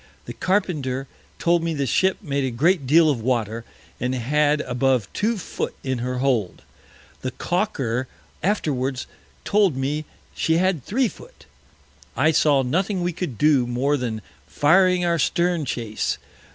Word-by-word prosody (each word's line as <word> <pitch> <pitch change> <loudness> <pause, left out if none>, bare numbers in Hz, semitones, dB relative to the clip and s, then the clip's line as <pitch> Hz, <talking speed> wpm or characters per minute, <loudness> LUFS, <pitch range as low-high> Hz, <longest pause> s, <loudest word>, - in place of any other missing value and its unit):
The - - -6
Carpenter 150 -9 -1 0.3
told 170 0 +2
me 165 -1 -2
the 140 -1 -1
Ship 190 +9 +2
made 140 -4 -1
a 130 - 0
great 145 +4 +1
deal 160 +4 +6
of 125 -5 -2
Water, 115 -2 -1 0.4
and 125 +1 -1
had 145 +4 +2
above 125 -5 +1
two 225 +2 0
Foot 185 - -4
in 130 -2 -2
her 125 +1 -2
Hold. 125 -8 0 0.6
The 130 - -2
Caulker 130 - -1 0.3
afterwards 140 -9 -1 0.4
told 200 -9 +3
me 145 +3 -2 0.3
she 160 0 +1
had 180 -6 +1
three 250 - +1
Foot. - - -13 0.7
I 160 - +4
saw 145 -3 +3
nothing 185 +8 0
we 175 0 -1
could 165 - -4
do 145 -3 +3
more 130 +4 +1
than 115 -5 -3 0.2
firing 180 +4 +3
our 170 -1 +1
Stern 170 +1 +1
Chase. 115 -4 -2
145 Hz, 150 wpm, -23 LUFS, 125-175 Hz, 0.7 s, deal